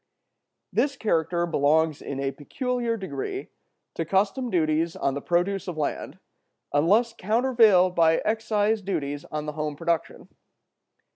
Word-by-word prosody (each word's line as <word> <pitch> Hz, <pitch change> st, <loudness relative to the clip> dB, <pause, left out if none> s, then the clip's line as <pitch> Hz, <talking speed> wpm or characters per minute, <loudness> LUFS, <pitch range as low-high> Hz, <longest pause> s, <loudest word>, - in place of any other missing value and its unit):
This 280 Hz, 0 st, +1 dB
character 170 Hz, -4 st, 0 dB
belongs 160 Hz, -1 st, +2 dB
in 135 Hz, -, -5 dB
a 135 Hz, 0 st, -1 dB
peculiar 235 Hz, -, -2 dB
degree 155 Hz, -10 st, -5 dB, 0.4 s
to -, -, -2 dB
custom 195 Hz, -, 0 dB
duties 160 Hz, -2 st, +1 dB
on 135 Hz, -, -1 dB
the 140 Hz, -, -4 dB
produce 180 Hz, +5 st, 0 dB
of 175 Hz, -3 st, -5 dB
land, 150 Hz, -, -3 dB, 0.6 s
unless 205 Hz, +11 st, +3 dB
countervailed 220 Hz, -4 st, +3 dB
by 165 Hz, -2 st, +4 dB
excise 215 Hz, -1 st, +1 dB
duties 145 Hz, -7 st, -3 dB
on 150 Hz, 0 st, -5 dB
the 150 Hz, -, -3 dB
home 150 Hz, -1 st, -3 dB
production. 165 Hz, +2 st, -2 dB
175 Hz, 130 wpm, -25 LUFS, 155-215 Hz, 0.6 s, by